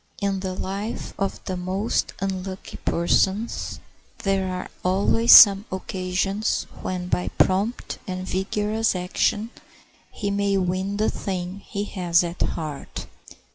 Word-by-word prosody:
In 200 -1 0
the 185 -1 -4
life 200 +4 -4
of 195 0 -2
the 185 - -2
most 185 +5 -1
unlucky 190 0 -4
persons 190 +6 0 0.4
there 195 -1 +1
are 180 - -4 0.2
always 200 +5 +3
some 200 -1 +10
occasions 190 +2 -1 0.2
when 180 -1 -3
by 180 0 0
prompt 200 +6 +1
and 185 0 -4
vigorous 210 +3 0
action 195 +5 0 0.6
he 200 -1 -3
may 200 0 +1
win 190 +2 -1
the 215 - +1
thing 185 0 -4
he 200 0 -4
has 180 -4 +2
at 170 +1 -5
heart. 155 -3 -4
190 Hz, 125 wpm, -24 LUFS, 185-200 Hz, 0.6 s, some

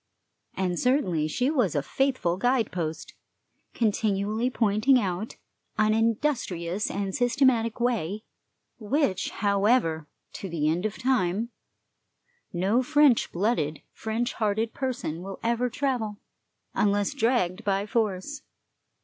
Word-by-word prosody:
And 180 -2 -1
certainly 190 - +1
she 250 - 0
was 240 - +1
a 145 - +1
faithful 260 - 0
guide 245 +2 +1
post, 160 -3 -4 0.6
continually 215 +1 0
pointing 225 +3 +3
out 195 0 -3 0.4
an 215 0 +3
industrious 220 - 0
and 195 -1 -3
systematic 245 -1 +2
way, 215 -4 -1 0.6
which, 220 - 0
however, 200 -6 +1 0.3
to 195 - -6
the 155 -3 -1
end 175 +6 +1
of 215 - -8
time, 230 -4 0 1.0
no 195 +8 +2
French 290 -2 +4
blooded, 175 -6 -1
French 225 +3 -2
hearted 220 +1 -1
person 245 - -3
will 195 +1 -7
ever 235 +2 +1
travel, 245 -5 -2 0.6
unless 205 +1 +1
dragged 225 -7 +1
by 200 -1 0
force. 215 +5 -2
215 Hz, 115 wpm, -26 LUFS, 185-245 Hz, 1.0 s, French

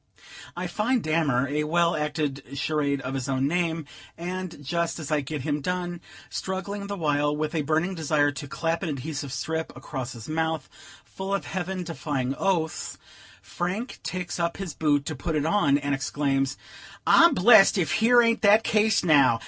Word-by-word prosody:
I - - -2
find 235 +2 0
Dammer 150 -5 +1
a 150 +2 -1
well 170 +2 +2
acted 145 -3 -3
charade 145 -1 0
of 130 0 -4
his 135 0 -3
own 135 0 +1
name, 165 -1 -1 0.3
and, 175 -3 -5
just 170 +3 -1
as 155 -2 -6
I 150 -1 +2
get 145 0 -5
him 150 -1 -1
done, 175 +1 -3 0.3
struggling 200 +2 -4
the 200 0 -4
while 145 -2 +1
with 155 +1 -2
a 160 - +1
burning 160 +5 0
desire 150 -3 +1
to 145 0 -7
clap 165 +3 -2
an 175 - -2
adhesive 140 0 -4
strip 160 +4 -3
across 130 -3 -5
his 115 -2 -10
mouth, 160 -1 -1 0.4
full 195 +1 -3
of 200 - -4
heaven 185 0 -3
defying 140 -5 -2
oaths, 170 -5 -1 0.5
Frank 190 +8 -4
takes 180 -1 -4
up 170 0 -1
his 195 -5 -5
boot 145 -2 +1
to 155 - -3
put 160 +4 -3
it 150 0 0
on, 160 -6 +3
and 140 -1 -2
exclaims: 135 0 0 0.5
"I'm 335 - +6
blest 205 +1 +7
ef 170 -6 0
here 240 +2 +5
ain't 230 0 +2
that 215 +1 +6
case 215 -1 +2
now! 140 -8 +5
160 Hz, 175 wpm, -26 LUFS, 145-180 Hz, 0.5 s, blest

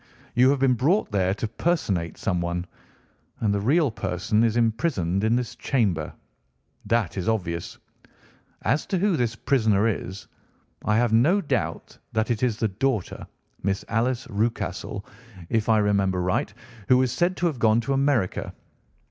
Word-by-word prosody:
You 125 +1 +5
have 140 - +3
been 135 -1 +3
brought 150 - +1
there 95 -1 +1
to 110 - -3
personate 105 - -1
someone, 90 -3 -1 0.7
and 105 -2 +1
the 100 - 0
real 145 +5 +3
person 105 +1 0
is 115 0 +2
imprisoned 110 - 0
in 110 +2 +3
this 125 -2 -2
chamber. 100 - 0 0.8
That 115 -7 0
is 95 - -1
obvious. 85 -7 -2 0.9
As 135 +8 0
to 190 - 0
who 195 0 +2
this 120 -5 0
prisoner 110 -5 +2
is, 95 -3 -4 0.6
I 105 0 +2
have 120 -1 +2
no 150 - +4
doubt 140 - -3
that 110 +2 0
it 110 - -1
is 120 -4 +1
the 110 - +1
daughter, 115 0 -2 0.3
Miss 100 +1 -1
Alice 120 +3 0
Rucastle, 100 -2 -2 0.4
if 115 -1 0
I 110 - +5
remember 100 -3 +2
right, 90 +2 0 0.4
who 125 - +6
was 130 -1 +2
said 175 +7 0
to 175 - -1
have 155 -7 0
gone 110 0 +4
to 135 +4 -1
America. 135 -8 0
110 Hz, 155 wpm, -25 LUFS, 100-130 Hz, 0.9 s, who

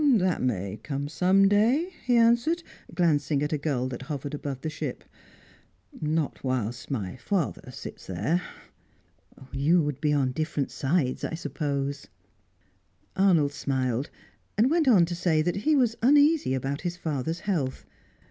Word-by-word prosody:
"That 185 -4 +1
may 100 -4 -2
come 140 0 -3
some 185 +5 +4
day," 245 - +2
he 245 - +2
answered, 235 +9 +3 0.3
glancing 150 -4 +2
at 150 - -1
a - - +1
gull 140 -4 -1
that 125 -1 -6
hovered 140 0 -5
above 140 -3 -5
the 155 - -3
ship. 150 -4 -5 1.0
"Not 155 -1 -1
whilst 125 -3 -2
my 110 -5 -3
father 165 -3 -2
sits 125 - -9
there." 105 - 0 1.1
"You 150 +6 +3
would 145 -2 -3
be 150 -2 +2
on 135 -3 +2
different 155 0 -2
sides, 135 -2 0
I - - -2
suppose." 140 -4 -3 1.1
Arnold 170 -7 +3
smiled, 130 -2 -1 0.5
and 235 +6 +4
went 325 -3 +2
on 200 -9 +6
to 175 - -5
say 170 -3 +1
that 175 +3 -1
he 300 +10 +2
was 245 -5 +2
uneasy 290 - +4
about 135 +2 -3
his 175 -1 -3
father's 160 0 -3
health. 155 -10 -2
155 Hz, 145 wpm, -27 LUFS, 135-190 Hz, 1.1 s, on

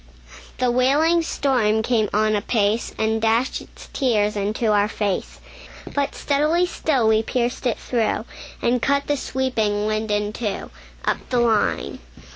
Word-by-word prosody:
The 250 -1 +1
wailing 290 +7 +3
storm 245 -9 +1
came 220 -3 +1
on 215 +1 +2
apace, 210 +1 0
And 220 0 0
dashed 225 +3 +1
its - - -14
tears 210 -6 +1
into 210 +2 0
our 205 0 +3
fade; 205 -3 -1 0.7
But 285 -1 -1
steadily 305 +5 +1
still 275 -9 0
we 220 0 +4
pierced 245 +2 -1
it 235 - 0
through, 235 -3 -1 0.4
And 240 0 +2
cut 280 +2 +1
the 290 - +1
sweeping 230 -7 -1
wind 215 0 -1
in 210 0 0
two, 210 -4 -4 0.3
Up - - +1
the 250 - +1
line. 225 -3 +1
230 Hz, 145 wpm, -22 LUFS, 215-260 Hz, 0.7 s, we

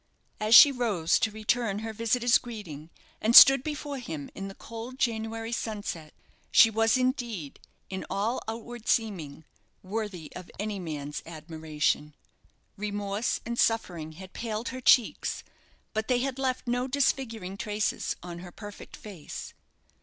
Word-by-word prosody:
As 215 +2 +5
she 285 - +11
rose 210 -10 +1
to 220 - +1
return 215 0 -1
her 225 - -4
visitor's 235 +2 +3
greeting, 170 -11 -9 0.3
and 225 +2 +2
stood 270 -1 +11
before 295 -2 -4
him 160 - -6
in 195 - -6
the 195 - -9
cold 230 +3 -8
January 225 -2 -2
sunset, 205 -9 -4 0.3
she 225 - +7
was 225 +2 +3
indeed, 240 - -2 0.3
in 190 0 -5
all 210 +5 -1
outward 230 +1 -7
seeming, 170 -10 -1 0.4
worthy 195 -4 -5
of 180 - -9
any 205 0 -3
man's 150 -4 -5
admiration. 155 -2 -2 0.6
Remorse 205 +1 -2
and 235 +1 -3
suffering 175 -8 0
had 185 +3 -12
paled 225 0 -4
her 255 0 -6
cheeks; 245 -2 +3 0.5
but 220 -1 -2
they 250 - +3
had 270 0 -3
left 260 -1 -1
no 245 +1 0
disfiguring 240 -8 -1
traces 210 +1 -2
on 175 -1 -7
her 175 0 -10
perfect 205 +1 -10
face. 190 -8 -9
215 Hz, 140 wpm, -28 LUFS, 180-235 Hz, 0.6 s, she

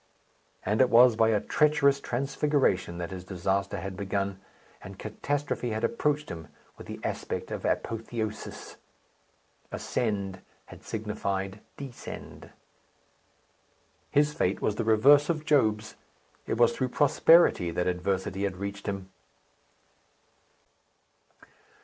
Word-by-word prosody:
And 105 +5 +2
it 130 - +5
was 120 0 +7
by 110 0 +4
a 110 -2 +3
treacherous 140 -1 +3
transfiguration 135 - 0
that 85 0 -5
his 90 -1 -6
disaster 95 +2 -1
had 95 0 -5
begun; 100 0 -2 0.4
and 100 0 -10
catastrophe 140 +4 -3
had 110 0 -3
approached 150 +5 0
him 80 -2 -7 0.3
with - - -12
the - - -7
aspect - - -4
of - - -4
apotheosis! 115 -1 -3 0.9
Ascend 100 -5 -2 0.2
had - - -14
signified 100 -2 -3 0.2
Descend! 135 -4 -9 1.6
His 150 +1 +3
fate 95 -6 0
was 105 - 0
the 115 - 0
reverse 135 +8 +5
of 155 -2 -1
Job's. 110 -8 +2 0.5
It - - -1
was 120 0 +4
through 130 -1 -1
prosperity 150 - +5
that 90 +1 -1
adversity 95 +1 -1
had 95 -2 -3
reached 100 +2 -6
him. 95 -1 -4
110 Hz, 115 wpm, -28 LUFS, 95-135 Hz, 1.6 s, was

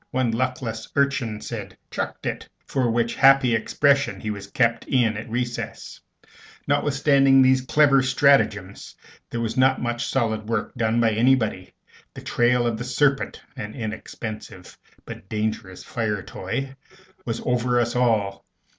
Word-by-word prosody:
One 130 -2 0
luckless 115 -1 -3
urchin 140 -6 0
said, 100 -5 -7
"Chucked - - -4
it," - - -4 0.2
for 130 -3 0
which 115 0 0
happy 135 -2 +5
expression 140 +5 +1
he 110 - -4
was 100 -1 -7
kept 115 +1 +1
in 120 -5 +1
at 110 +2 -7
recess. 120 +1 -4 0.7
Notwithstanding 140 -1 +3
these 130 0 +4
clever 135 +1 +4
stratagems, 130 -7 +1 0.3
there 120 - -3
was 115 +1 -3
not 130 0 +4
much 120 0 -2
solid 110 -4 -1
work 115 -2 -2
done 115 -1 0
by 115 -1 +3
anybody. 110 -4 +1 0.4
The - - -8
trail 120 0 +2
of 115 -2 -1
the - - -3
serpent 135 +2 0 0.2
(an 105 -5 -7
inexpensive 110 -4 -7 0.3
but 95 - -10
dangerous 105 -3 -3
fire 105 -4 -3
toy) 135 +8 -5 0.5
was 115 -1 -3
over 125 0 +1
us 120 0 -1
all. 110 -5 +1
120 Hz, 140 wpm, -23 LUFS, 110-130 Hz, 0.7 s, happy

